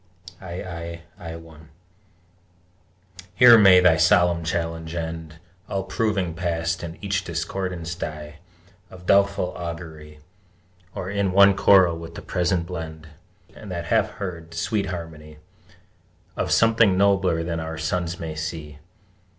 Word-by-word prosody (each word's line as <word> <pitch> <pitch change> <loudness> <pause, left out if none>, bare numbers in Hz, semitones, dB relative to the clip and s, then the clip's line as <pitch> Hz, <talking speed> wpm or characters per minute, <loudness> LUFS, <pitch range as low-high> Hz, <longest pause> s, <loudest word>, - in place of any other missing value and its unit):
III 85 -2 -7
1 80 -2 -11 1.7
Here 125 0 +9
may 95 -3 +8
thy 90 -3 +5
solemn 85 +1 +3
challenge 80 0 -3
end, 80 -1 -5 0.3
All 95 -2 -2
proving 95 -4 -1
Past, 85 0 -2
and 85 0 -7
each 95 -1 -1
discordance 85 0 -4
die 75 -3 -7 0.5
Of 90 -1 -13
doubtful 100 -1 +2
augury, 80 -3 -8 0.8
Or 95 +1 -5
in 100 -2 0
one 100 0 +6
choral 95 -5 +5
with 85 0 -10
the - - -8
Present 90 -1 0
blend, 80 -3 -7 0.5
And 105 - -11
that 85 -2 -4
half - - +2
heard, 85 -4 -7
sweet 100 +4 -1
harmony 80 -3 -8 1.0
Of - - -2
something 115 -4 +4
nobler 95 -4 +2
that 85 -1 -3
our 80 0 -5
sons 85 +1 -2
may 80 -1 -5
see! 75 -2 -6
85 Hz, 125 wpm, -23 LUFS, 80-95 Hz, 1.7 s, Here